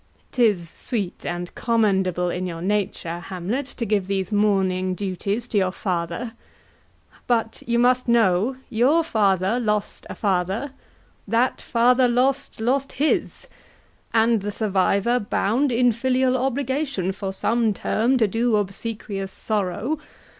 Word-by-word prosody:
'Tis 210 -9 +2
sweet 200 +2 -4
and 175 0 -4
commendable 190 -6 +1
in 185 +1 -3
your 165 -2 -5
nature, 180 -3 -2
Hamlet, 190 +9 -4
To 240 - -5
give 200 -3 0
these 195 -1 -2
mourning 190 -3 +1
duties 200 +4 -3
to 210 - +2
your 185 -1 +1
father; 185 +5 -3 0.9
But 230 -2 0
you 235 0 +1
must 250 +1 +3
know, 230 +1 +3
your 270 +9 +3
father 200 - +1
lost 210 -3 -2
a - - -6
father, 195 +6 -1 0.6
That 230 +5 +1
father 250 +2 +3
lost, 260 +3 0
lost 265 +4 0
his, 295 - 0 0.7
and 225 -1 +3
the 205 - -3
survivor 205 +3 +1
bound 230 +6 0
In 245 +1 +4
filial 255 +2 +1
obligation, 265 - -1
for 195 0 -4
some 225 +3 +1
term 230 +5 +1
To 225 -3 +3
do 225 +3 +1
obsequious 200 -1 -3
sorrow. 215 - -2
215 Hz, 130 wpm, -23 LUFS, 190-245 Hz, 0.9 s, In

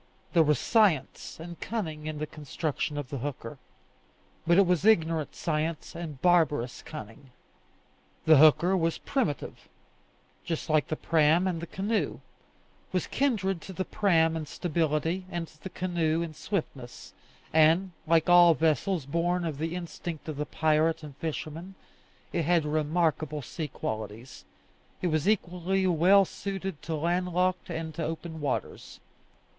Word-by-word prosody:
There 170 - +6
was 150 -2 +3
science 185 - +1
and 170 +1 -8
cunning 160 -9 -4
in 155 -1 -4
the 155 - -2
construction 150 0 -4
of 145 -3 -4
the 140 - -3
hooker, 135 -1 -6 0.9
but 170 +1 +5
it 200 - +6
was 180 -1 +1
ignorant 165 -7 +2
science 155 0 -2
and 155 -5 -7
barbarous 155 -8 +2
cunning. 135 -2 -10 1.0
The 160 -1 +7
hooker 155 +5 +6
was 165 -2 0
primitive, 235 - -3 0.7
just 165 -1 -3
like 155 -2 +3
the 155 - -2
praam 160 +3 +3
and 175 -3 -1
the 170 - -6
canoe; 205 +5 -1 0.7
was - - 0
kindred 200 -10 0
to 190 - -9
the 185 +1 -3
praam 165 -5 +2
in 155 -2 -4
stability, 165 +2 -1
and 170 -2 -4
to 155 -1 -21
the 190 - -6
canoe 170 -3 0
in 165 -2 -6
swiftness; 145 - -5 0.4
and, 160 +4 +4 0.2
like 165 0 +3
all 175 -2 +7
vessels 160 +1 +1
born 170 +4 0
of 150 -4 -4
the 165 +2 -2
instinct 170 -2 -6
of 155 -3 -4
the 150 0 -3
pirate 160 +1 +1
and 145 -3 -9
fisherman, 165 +4 -5 0.6
it 170 - +1
had 170 -1 +3
remarkable 155 -1 0
sea 155 +5 -5
qualities: 110 - -6 0.5
it 180 - 0
was 155 +4 +1
equally 190 -1 0
well 185 +3 +5
suited 195 -4 -5
to 160 - -3
landlocked 180 +3 0
and 160 -1 -4
to 165 - -4
open 160 0 -5
waters. 145 - -4
165 Hz, 145 wpm, -28 LUFS, 150-180 Hz, 1.0 s, The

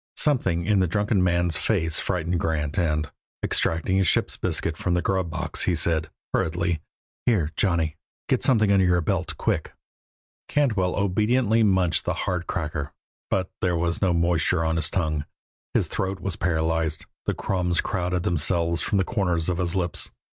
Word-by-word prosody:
Something 95 - +2
in 105 -2 +3
the 95 - +2
drunken 105 +1 +1
man's 85 -2 +2
face 80 -7 +1
frightened 90 -2 -1
Grant 75 -1 -1
and, 75 -3 0 0.3
extracting 85 +4 +1
a - - +4
ship's 90 - +2
biscuit 85 - -1
from 90 +2 -1
the 90 - +1
grub 95 -3 0
box, - - -2
he 90 - +2
said, 80 0 0 0.2
hurriedly: 85 0 0 0.5
"Here, 90 -11 +2
Johnny. 85 -5 +1 0.3
Get - - +1
something 110 -6 +3
under 100 -1 +4
your 90 -1 +3
belt, 85 -3 -2
quick." - - -1 0.7
Cantwell 110 -11 +1
obediently 110 +4 +2
munched 95 -6 +2
the - - 0
hard 90 -2 -2
cracker, 75 -4 -3 0.4
but 95 -1 -1
there 90 -2 +1
was 85 0 -1
no 95 -3 +3
moisture 85 0 +1
on 80 0 +1
his 80 -1 0
tongue; 80 -5 -1 0.5
his - - +3
throat 95 0 -3
was 95 -3 -2
paralyzed; 80 -2 0 0.2
the - - +1
crumbs 90 -2 0
crowded 90 -2 -1
themselves 85 0 +1
from 105 - 0
the 95 - +3
corners 90 -7 0
of 90 0 -1
his 90 0 -1
lips. 90 -3 -1
90 Hz, 165 wpm, -25 LUFS, 80-95 Hz, 0.7 s, a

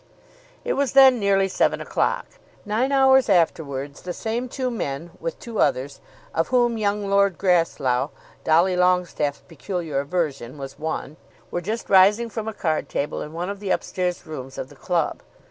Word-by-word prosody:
It - - +1
was 280 -2 0
then 265 -2 +7
nearly 195 -1 +3
seven - - +1
o'clock. - - -1 0.4
Nine 225 +6 0
hours 265 -2 +5
afterwards 145 -6 0
the 180 - -5
same 235 +5 -3
two 255 0 -2
men, 165 - -4
with 165 0 -5
two 230 -3 -6
others, 135 +2 0 0.3
of 165 0 0
whom 240 -3 +2
young 205 -1 0
Lord 200 -2 +3
Grasslough, 150 -8 +1 0.3
Dolly 170 +4 +3
Longestaffe's 180 -5 +1
peculiar 165 -3 -3
aversion, 140 -4 -2
was 135 +1 -8
one, 155 -1 -4 0.3
were 175 - -2
just 220 +5 -4
rising 205 +5 +5
from 220 +1 -4
a 220 - -3
card 160 -5 -1
table 145 - -2
in 150 - -6
one 175 +4 -3
of 200 - -7
the 200 -2 -3
up - - +1
stairs 180 -1 -3
rooms 135 -4 -8
of 130 - -5
the - - -15
club. 175 -3 -1
180 Hz, 170 wpm, -23 LUFS, 155-215 Hz, 0.4 s, then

